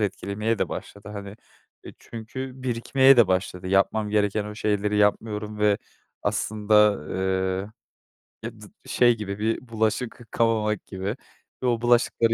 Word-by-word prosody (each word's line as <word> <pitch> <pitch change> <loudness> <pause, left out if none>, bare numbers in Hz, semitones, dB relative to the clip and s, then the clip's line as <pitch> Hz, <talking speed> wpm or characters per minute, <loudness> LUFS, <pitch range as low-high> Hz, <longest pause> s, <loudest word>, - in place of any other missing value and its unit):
etkilemeye 105 +2 -1
de - - 0
başladı, 100 0 -8
hani, 100 0 -8 0.5
e, - - -9
çünkü 115 +4 -7
birikmeye 130 +2 +4
de 120 -4 +7
başladı. 90 -1 -1
Yapmam 100 +2 +2
gereken 105 0 +1
o 105 0 -7
şeyleri 105 -1 0
yapmıyorum 105 0 0
ve 105 -1 +3 0.4
aslında, 105 -4 +2 1.4
eee, - - -3
e - - -17
dı - - -10 0.2
şey 120 -2 +3
gibi 100 -1 -5
bir 115 +3 -1
bulaşık 110 +2 -1
yıkamamak 110 -2 0
gibi 95 +4 -4 0.5
ve - - +2
o 120 -1 +1
bulaşıkları 120 -1 +3
105 Hz, 135 wpm, -25 LUFS, 105-115 Hz, 1.4 s, de